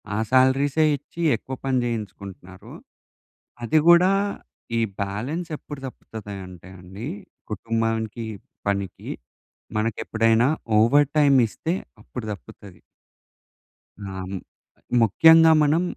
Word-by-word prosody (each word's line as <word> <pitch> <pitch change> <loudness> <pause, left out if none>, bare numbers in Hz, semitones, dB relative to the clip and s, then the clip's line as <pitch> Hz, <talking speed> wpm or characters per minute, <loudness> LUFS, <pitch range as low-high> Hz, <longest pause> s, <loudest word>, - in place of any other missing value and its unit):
ఆ - - -1
సాలరీసే 135 +4 +3
ఇచ్చి 155 +5 -10
ఎక్కువ 130 +4 -7
పని 130 -1 +1
చేయించుకుంటున్నారు. 100 -5 -7 0.9
అది 135 +7 +3
గూడా 175 +2 +7 0.7
ఈ - - +2 0.2
బ్యాలెన్స్ 125 - -3
ఎప్పుడు 145 -1 -9
తప్పుతది 110 -5 -9
అంటే 90 0 -13
అండి, 95 +7 -8 0.4
కుటుంబానికి 115 +1 -2 0.4
పనికి 100 -2 -3 0.7
మనకెప్పుడైనా 115 +1 +1 0.3
ఓవర్ 140 +6 +5
టైమ్ 140 -2 +5
ఇస్తే 165 - -3 0.3
అప్పుడు 120 0 -7
తప్పుతది. 100 -1 -13 1.2
ఆ! - - -6 1.0
ముఖ్యంగా 160 +9 +6
మనం 150 +3 +3
115 Hz, 95 wpm, -23 LUFS, 105-145 Hz, 1.2 s, గూడా